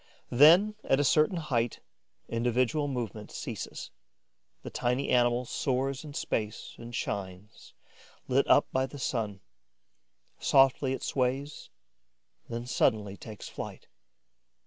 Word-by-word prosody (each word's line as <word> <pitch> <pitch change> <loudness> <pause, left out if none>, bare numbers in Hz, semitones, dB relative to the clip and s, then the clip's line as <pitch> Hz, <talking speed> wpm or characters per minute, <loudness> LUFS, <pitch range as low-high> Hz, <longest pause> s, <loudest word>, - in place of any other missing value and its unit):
Then, 170 - +7
at 135 - +2
a - - +3
certain 155 +6 +3
height, 120 -8 -1 0.5
individual 125 +5 +1
movement 115 -5 -4
ceases. - - -6 0.7
The - - -7
tiny 125 +3 -1
animal 120 0 +3
soars 135 +3 -1
in 145 -2 -9
space 105 -1 -3
and 120 0 -8
shines, 100 -1 -6 0.5
lit - - +2
up - - +6
by 130 0 +1
the 145 - -10
sun. 110 -7 -2 1.0
Softly 135 0 +4
it - - -5
sways, 135 +3 -2 0.8
then 120 +1 -4
suddenly 105 -5 +1
takes 105 0 -9
flight. - - -8
125 Hz, 115 wpm, -29 LUFS, 115-140 Hz, 1.0 s, Then